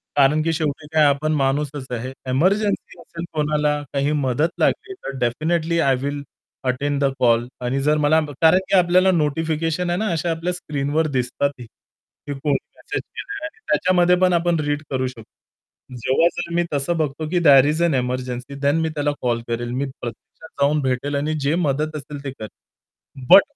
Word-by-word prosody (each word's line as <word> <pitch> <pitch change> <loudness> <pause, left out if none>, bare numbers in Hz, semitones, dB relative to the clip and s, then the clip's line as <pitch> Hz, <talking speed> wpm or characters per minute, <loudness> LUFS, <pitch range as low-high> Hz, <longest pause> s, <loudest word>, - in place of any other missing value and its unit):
कारण 145 +2 +4
की 165 - +1
शेवटी 150 -1 -2
काय 155 -1 +5
आपण 145 +2 +2
माणूसच 140 0 -1
आहे. 125 +2 -4 0.2
एमर्जन्सी 195 +10 +1
असेल 170 0 -8
कोणाला, 150 -1 +1
काही 140 +1 +1
मदत 140 +6 +1
लागली 395 - +1
तर 375 - -7
definitely 160 +7 0
I 135 -4 +3
will 145 +1 -3 0.5
attend 140 +2 -1
the 135 - +3
call 120 -1 +3 0.2
आणि 135 +3 0
जर 150 +2 +2
मला 150 +1 +4 0.2
कारण 165 +3 +6
की - - +3
आपल्याला 180 +1 +4
नोटिफिकेशन 165 +1 0
आहे 175 - 0
ना 220 - 0
अशा 165 +1 -1
आपल्या 170 +2 -2
स्क्रीनवर 150 -2 -1
दिसतात, 125 +3 0
की 125 +4 -12
कोणी 140 +1 0 0.2
मेसेज - - -5
केलेला 405 -6 -7
आहे. 325 +7 -9
त्याच्यामध्ये 180 -1 +3
पण 185 -1 +4
आपण 170 -1 +2
रीड 145 0 -1
करू 130 -1 -1
शकतो. 125 +1 -15
जेव्हा 130 +8 +3
जर 170 -1 -4
मी 175 - +3
तसं 145 +5 0
बघतो 155 0 -2
की 175 - +1
there 135 -2 +8
is 155 +3 0
N 170 -3 +3
emergency 125 +1 -3
than 140 +1 +2
me 160 - 0
त्याला 145 -1 -1
कॉल 120 -2 0
करेल, 120 +1 -3
मी 130 +3 -1
प्रत्यक्षात 135 +3 -10
जाऊन 150 +2 +3
भेटेल 130 +2 -1
आणि 150 +2 -1
जे 150 +4 +2
मदत 155 -1 0
असेल 145 -1 -7
ते 135 - -4
करेल. 110 -5 -8 0.8
बट 200 - +10
150 Hz, 180 wpm, -21 LUFS, 135-165 Hz, 0.8 s, बट